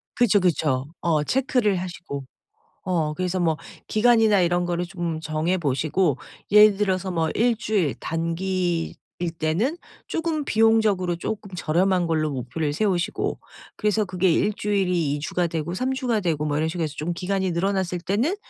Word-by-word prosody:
그쵸, 230 -4 +4
그쵸. 155 -7 +1 0.2
어 160 -3 +2
체크를 250 - +1
하시고. 175 -6 -6 0.6
어 165 -5 0
그래서 185 +2 -2
뭐 165 -3 +1 0.3
기간이나 220 -2 +4
이런 175 0 +1
거를 175 0 -1
좀 170 -2 -4
정해 160 +4 0
보시고 155 0 +1 0.3
예를 210 -1 +7
들어서 190 -2 0
뭐 165 -2 0
1 235 +1 +3
주일 205 - 0
단기일 170 +1 -1 0.4
때는 195 - 0 0.3
쪼금 320 -3 -2
비용적으로 220 -6 +3
쪼끔 205 +3 -5
저렴한 180 +2 +1
걸로 155 -2 0
목표를 135 +4 -3
세우시고 185 0 0 0.4
그래서 210 0 +1
그게 185 -1 +1
1 205 +6 +2
주일이 180 -8 0
2 145 - -2
주가 175 +4 -1
되고 165 0 -3
3 255 +8 -1
주가 250 -5 0
되고 160 -5 -1
뭐 145 -1 0
이런 160 +1 0
식으로 165 0 -2
해서 155 -1 -4
좀 170 +3 -2
기간이 190 +1 -1
늘어났을 180 0 -1
때는 215 - 0
180 Hz, 320 characters per minute, -24 LUFS, 160-205 Hz, 0.6 s, 예를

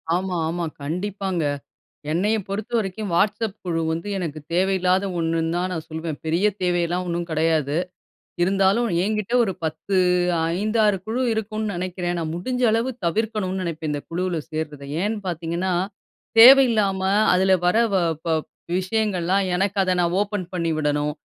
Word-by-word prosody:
ஆமா, 185 0 -2
ஆமா. 170 0 -2 0.2
கண்டிப்பாங்க. 190 +3 -2 0.7
என்னைய 205 +7 +1
பொறுத்தவரைக்கும் 205 0 -2
Whatsapp 210 +2 +1
குழு 165 -2 -1
வந்து, 165 +5 -4
எனக்கு 160 -4 -4
தேவையில்லாத 185 +1 +2
ஒண்ணுன்னு 165 0 0
தான் 185 +1 -1
நான் 160 -2 -5
சொல்லுவேன். 160 -1 -5
பெரிய 170 +6 +1 0.2
தேவையெல்லாம் 175 0 0
ஒண்ணும் 170 0 -2
கெடையாது. 155 -2 +1 0.7
இருந்தாலும் 195 +5 +2
என்கிட்ட 215 +2 -2
ஒரு 195 -4 0
10 160 +5 -2 0.6
5-6 215 0 +2
குழு 235 +4 -2
இருக்குனு 215 0 -3
நெனைக்கிறேன். 175 0 -3
நான் 160 -1 -3
முடிஞ்ச 250 +8 -3
அளவு 230 +4 +1
தவிர்க்கணும்னு 200 0 -1
நெனைப்பேன் 160 -3 -3
இந்த 145 - -2
குழுவுல 180 0 -1
சேர்றத. 155 -2 -4 0.2
ஏன்னு 215 +2 0
பாத்தீங்கன்னா 170 +2 -2 0.7
தேவையில்லாம, 225 -6 +7 0.3
அதில 190 +1 +3
வர 180 +5 +3 0.2
வ - - +3 0.3
ப - - -3 0.5
விஷயங்கள்லாம், 195 -1 0
எனக்கு 195 +2 0
அத 185 -1 +1
நான் 175 0 +1
ஓப்பன் 205 -3 -2
பண்ணி 170 -2 -1
விடணும். 150 0 0
185 Hz, 135 wpm, -23 LUFS, 170-205 Hz, 0.7 s, தேவையில்லாம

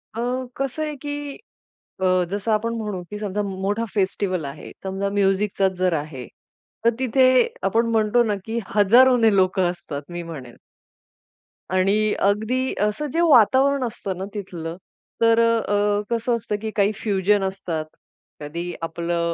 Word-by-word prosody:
अ, - - -4 0.4
कसं 275 +3 -2
आहे 300 -1 -3
की 290 -1 -5 0.6
अ, 185 -1 +3
जसं 205 +2 -1
आपण 230 +2 0
म्हणू 210 -5 -4
की 210 - -5
समजा 210 0 -2
मोठा 195 +4 -2
फेस्टिव्हल 190 -4 0
आहे 140 - -8
समजा 195 +1 -2
म्युझिकचा 195 0 +1
जर 185 -1 +2
आहे, 145 -5 -5 0.6
तर 235 - +6
तिथे 260 0 +3 0.4
आपण 225 +4 +2
म्हणतो 225 +2 +3
ना 210 -2 0
की 225 +1 -3 0.2
हजारोने 225 +1 +5
लोकं 185 -1 +2
असतात 150 -5 -7
मी 175 0 -4
म्हणेन. 135 -8 -9 1.2
आणि 205 +3 +2
अगदी 235 +6 0
असं 210 +8 0
जे 335 - +2
वातावरण 270 -1 +5
असतं 200 -5 -4
ना 190 - -4
तिथलं, 175 -5 -6 0.5
तर 230 0 +5
अ, 230 -3 +2 0.3
कसं 235 +1 0
असतं 215 -2 -3
की 220 -1 -3
काही 205 0 +3
फ्युजन 200 -1 +1
असतात, 185 -5 -3 0.6
कधी 170 +4 -5
आपलं 170 +1 -2
205 Hz, 145 wpm, -23 LUFS, 185-230 Hz, 1.2 s, तर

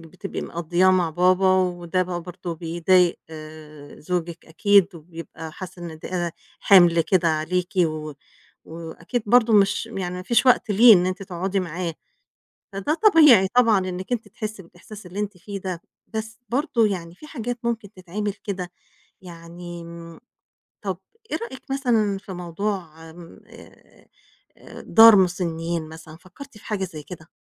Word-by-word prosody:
بتبقي 180 +4 -7
مقضّياه 175 +3 +1
مع 180 -3 +2
بابا 185 +3 +3
وده 180 -1 0
بقى 175 -1 -5
برضه 175 -1 -7
بيضايق 175 +2 +2 0.8
زوجِك 170 0 -4
أكيد 195 +3 +3
وبيبقى 165 -1 -10
حاسس 185 +1 -9
إن 165 -2 -8
ده 175 -1 -3 0.3
حِمْل 175 -4 +6
كده 170 +1 +2
عليكِ 175 +4 -1
و 155 -1 -4 0.5
وأكيد 170 +8 -6
برضه 235 0 +4
مش 200 +2 +3
يعني 185 -5 -5
ما 180 - -6
فيش 235 +5 +2
وقت 245 -3 +4
ليه 225 +3 +8
إن 180 -1 +2
أنتِ 185 +1 -3
تقعُدي 190 +1 -2
معاه، 170 -1 -4 0.8
فده 200 +10 -1
طبيعي 305 - +6
طبعًا 230 -3 +4
إنِّك 185 +4 -5
أنتِ 230 -2 -2
تحسّي 215 -2 -7
بالإحساس 185 +4 -13
اللي 190 +4 -6
أنتِ 205 -2 -4
فيه 200 +1 -7
ده. 180 -3 -5 0.3
بس 220 0 -6
برضه 255 -3 +1
يعني 175 -4 -4
في 305 - -14
حاجات 245 -4 -5
ممكن 225 -3 -3
تتعمل 195 +3 -4
كده، 185 -3 -4 0.5
يعني 170 -1 -10
م 170 +1 -11 0.6
طَب 190 -3 -3 0.3
إيه - - +1
رأيِك 250 +3 -8
مثلًا 225 -7 +1
في 195 -1 -10
موضوع 175 -1 -4
آآ 165 +1 -13 1.2
آآ - - -13
دار 225 -1 +8
مُسنّين 170 -3 -1
مثلًا، 160 0 -12
فكّرتِ 210 +8 -14
في - - -20
حاجة 205 -3 -2
زي 155 -4 -8
كده؟ 165 -1 -11
185 Hz, 145 wpm, -23 LUFS, 170-210 Hz, 1.2 s, ليه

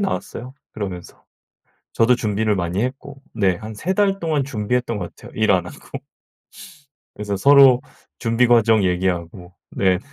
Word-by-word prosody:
나왔어요, 135 -9 -4 0.2
그러면서. 95 -4 -7 0.7
저도 120 +2 +3
준비를 110 -2 0
많이 90 +4 -2
했고 135 +2 -6
네 95 -5 +1
한 110 +2 -9
3 175 - -2
달 195 -1 +1
동안 155 -4 0
준비했던 120 -1 -2
것 90 - -7
같아요, - - -14
일 110 -1 +1
안 90 -3 +2
하고. - - -10 1.1
그래서 105 -1 -3
서로 135 +2 +6 0.4
준비 115 +1 +2
과정 115 -3 +4
얘기하고 90 0 -2 0.2
네네. 95 -2 +1
110 Hz, 290 characters per minute, -20 LUFS, 95-125 Hz, 1.1 s, 서로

